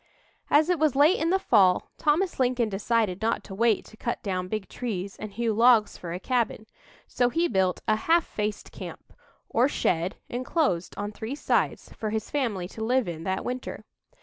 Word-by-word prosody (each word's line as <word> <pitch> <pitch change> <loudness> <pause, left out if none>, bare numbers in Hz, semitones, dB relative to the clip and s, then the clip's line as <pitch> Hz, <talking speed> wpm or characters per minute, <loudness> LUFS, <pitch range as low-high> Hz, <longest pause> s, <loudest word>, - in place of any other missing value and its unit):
As 310 +4 +4
it 350 - +1
was 305 -4 +2
late 295 +7 +5
in 325 - +1
the 380 - +4
fall, 190 - +3
Thomas 330 +4 +1
Lincoln 250 -3 +2
decided 205 -1 0
not 225 +1 0
to 195 - -9
wait 225 +1 +2
to - - -15
cut 235 - -3
down 185 -3 -2
big 215 0 -3
trees 200 -6 -4
and 215 - -7
hew 225 +2 -1
logs 230 -1 +5
for 170 - -7
a 175 - -4
cabin, 230 -1 -1 0.4
so 245 -1 +1
he 335 +6 +1
built 190 - 0
a 215 - +4
"half 330 +9 +3
faced 210 0 -4
camp," - - -10 0.3
or 245 +3 +3
shed 175 - 0
enclosed 245 - -1
on 205 +1 -3
three 220 +5 -5
sides, 295 - 0
for 215 - -4
his 220 0 -3
family 225 -11 -1
to 220 - -6
live 250 0 +2
in 165 -1 -5
that 190 0 -2
winter. 250 +1 -5
225 Hz, 190 wpm, -26 LUFS, 195-255 Hz, 0.4 s, late